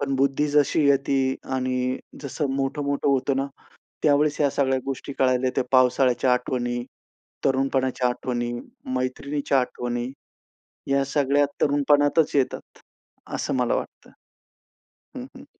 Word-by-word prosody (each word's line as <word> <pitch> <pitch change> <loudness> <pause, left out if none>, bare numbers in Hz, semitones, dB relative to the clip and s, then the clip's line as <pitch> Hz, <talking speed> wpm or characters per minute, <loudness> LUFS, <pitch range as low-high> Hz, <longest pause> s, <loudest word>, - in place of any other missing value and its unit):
पण 140 -1 -1
बुद्धी 140 +2 +1
जशी 145 +1 +3
येती 135 -1 +2 0.2
आणि 130 0 -1 0.2
जसं 140 +1 -2
मोठं-मोठं 140 +1 -1
होतं 135 0 +1
ना, 135 +1 0 0.6
त्यावेळेस 150 0 +3
या 145 - +3
सगळ्या 135 -1 +1
गोष्टी 135 +1 -4
कळायला 130 -1 +2
येत्या 125 0 0
पावसाळ्याच्या 130 0 +4
आठवणी, 120 -1 -1 0.6
तरुणपणाच्या 130 -1 +1
आठवणी, 120 -1 -2 0.4
मैत्रिणीच्या 135 +2 0
आठवणी 120 0 -3 0.8
या 140 0 +3
सगळ्या 145 0 +2 0.2
तरुणपणातच 145 +2 +3
येतात, 135 -2 -2 0.6
असं - - -2
मला 125 -2 +1
वाटतं. - - -7 1.1
हं, - - -6
हं. - - -12
135 Hz, 115 wpm, -24 LUFS, 130-140 Hz, 1.1 s, पावसाळ्याच्या